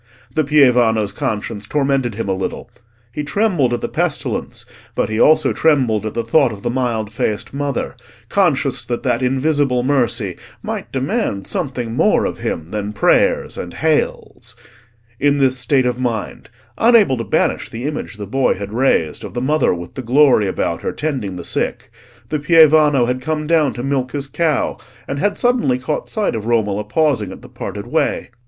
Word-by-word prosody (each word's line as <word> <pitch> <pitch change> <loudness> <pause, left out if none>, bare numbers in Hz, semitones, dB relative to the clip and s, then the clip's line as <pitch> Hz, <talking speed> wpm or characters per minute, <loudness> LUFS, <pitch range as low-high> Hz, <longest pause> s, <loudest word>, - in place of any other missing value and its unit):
The 155 - +2
pievano's 125 -8 +3
conscience 105 +1 -4
tormented 135 -5 0
him 115 -1 -3
a 95 - +1
little: 95 0 -5 0.4
he 150 - -4
trembled 175 - +1
at 120 -1 -1
the - - -2
pestilence, - - -2 0.3
but - - 0
he 110 +1 -2
also 155 - +4
trembled 125 -9 +2
at 110 - -6
the 115 - -1
thought 130 +2 +3
of 100 -2 -9
the - - -1
mild 120 -4 -1
faced 105 +1 -2
Mother, 140 -2 -3 0.3
conscious - - +1
that 120 -1 -3
that 125 -2 0
Invisible 135 0 +1
Mercy 120 -8 0 0.3
might - - -5
demand 135 - -2
something 130 - -3
more - - +3
of - - -4
him 80 +1 -4
than 105 0 -3
prayers - - +2
and 90 - -7
"Hails." 145 -6 -1 0.6
In 145 0 +3
this 130 -2 +2
state 130 +1 +2
of 125 0 -1
mind—unable 130 - +1
to 115 - -3
banish - - 0
the 115 +2 -7
image 150 -6 -4
the 105 - -5
boy 135 +6 +1
had 100 +2 -7
raised 115 - +1
of - - -8
the - - 0
Mother 150 +5 +2
with 85 -1 -5
the - - -5
glory 130 -3 +4
about - - -2
her - - -3
tending 130 -11 -3
the 90 - -7
sick—the 120 +3 -4
pievano 155 -4 +5
had 125 +1 -2
come 155 +1 -2
down 155 -3 +3
to 120 - -6
milk 135 -2 -1
his 140 -1 -2
cow, 155 +2 -1 0.3
and 140 - -3
had 205 +3 0
suddenly 245 - +2
caught 130 +4 -3
sight 215 -2 -1
of 110 -1 -4
Romola 105 -3 +1
pausing 115 - 0
at - - -11
the - - -11
parted - - -6
way. - - -1
125 Hz, 175 wpm, -18 LUFS, 110-145 Hz, 0.6 s, pievano